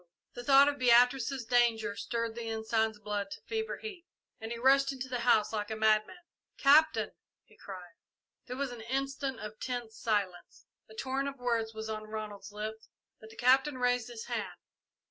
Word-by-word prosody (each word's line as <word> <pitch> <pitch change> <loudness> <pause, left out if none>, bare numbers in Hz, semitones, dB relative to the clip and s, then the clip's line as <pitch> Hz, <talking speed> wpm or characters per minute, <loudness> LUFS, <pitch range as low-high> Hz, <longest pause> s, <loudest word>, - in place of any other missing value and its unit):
The 245 - -7
thought 275 +2 +7
of 285 0 -1
Beatrice's 250 +1 +4
danger 225 -3 +2
stirred 230 0 -3
the 230 0 -5
Ensign's 220 0 0
blood 205 -1 -3
to - - -8
fever 445 +1 -3
heat, 385 -6 -9 0.3
and 225 0 -6
he 235 - -3
rushed 275 +3 +4
into 260 -1 -6
the 250 -1 -3
house 225 -3 +3
like 210 -1 -2
a 220 - -3
madman. 215 +9 +2 0.4
"Captain!" 310 +3 +5 0.3
he - - -23
cried. 180 -3 -10 0.5
There 250 0 -5
was 275 -2 -2
an 240 -2 -8
instant 270 +1 -3
of 215 0 -8
tense 240 -3 -5
silence. 200 -5 -2 0.2
A 220 - -13
torrent 270 +3 -2
of 280 - -10
words 230 -3 -1
was 220 0 -5
on 215 -1 -4
Ronald's 210 -2 -6
lips, 215 +1 -6 0.3
but 220 - -13
the 225 - -14
Captain 260 +3 +3
raised 245 -1 +1
his 235 -2 -8
hand. - - -4
235 Hz, 180 wpm, -31 LUFS, 220-265 Hz, 0.5 s, thought